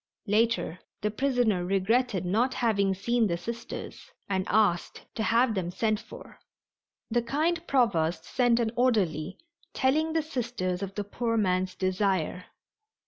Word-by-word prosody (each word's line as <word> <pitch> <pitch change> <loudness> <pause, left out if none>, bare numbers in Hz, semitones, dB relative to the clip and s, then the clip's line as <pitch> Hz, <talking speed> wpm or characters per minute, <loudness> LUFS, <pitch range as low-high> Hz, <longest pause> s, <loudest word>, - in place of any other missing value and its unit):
Later 220 -4 +1 0.2
the 210 - 0
prisoner 245 -6 +1
regretted 195 +2 +1
not 230 +8 +1
having 200 -6 +1
seen 235 +4 +1
the 170 -2 -1
Sisters, 235 +5 -7 0.2
and 190 -1 -1
asked 200 -4 +1
to - - -3
have 230 +2 +3
them 185 -4 -2
sent 215 +3 0
for. - - -12 0.7
The 240 +1 +2
kind 310 +8 0
Provost 170 -11 +1
sent 245 -2 +2
an 225 -2 0
orderly, 190 - +1 0.4
telling 310 +4 +2
the 325 -1 +1
Sisters 235 - -3
of 195 -1 -5
the 205 - -2
poor 230 +3 -2
man's 185 -2 +1
desire. 185 -2 0
215 Hz, 140 wpm, -28 LUFS, 185-240 Hz, 0.7 s, have